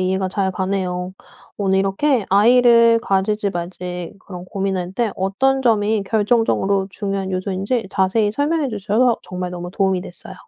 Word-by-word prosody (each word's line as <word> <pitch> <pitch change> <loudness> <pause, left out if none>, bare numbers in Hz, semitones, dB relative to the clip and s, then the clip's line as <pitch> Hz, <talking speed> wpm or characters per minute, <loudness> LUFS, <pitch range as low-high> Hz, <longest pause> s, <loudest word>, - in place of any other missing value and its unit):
이해가 190 +1 0
잘 190 0 -1
가네요. 185 -1 -2 0.4
오늘 190 -1 +1
이렇게 210 +5 +1
아이를 230 +2 +5
가질지 200 +1 0
말지 180 0 -6
그런 180 -2 -9
고민할 190 -1 -3
때 230 +1 0
어떤 265 +9 +1
점이 215 -3 +1
결정적으로 205 -2 +1
중요한 195 -1 -3
요소인지 195 +4 -2
자세히 200 +2 +1
설명해 290 +5 0
주셔서 220 +2 +1
정말 180 0 -5
너무 175 0 -7
도움이 190 -2 0
됐어요. 175 - -10
195 Hz, 350 characters per minute, -20 LUFS, 185-220 Hz, 0.4 s, 아이를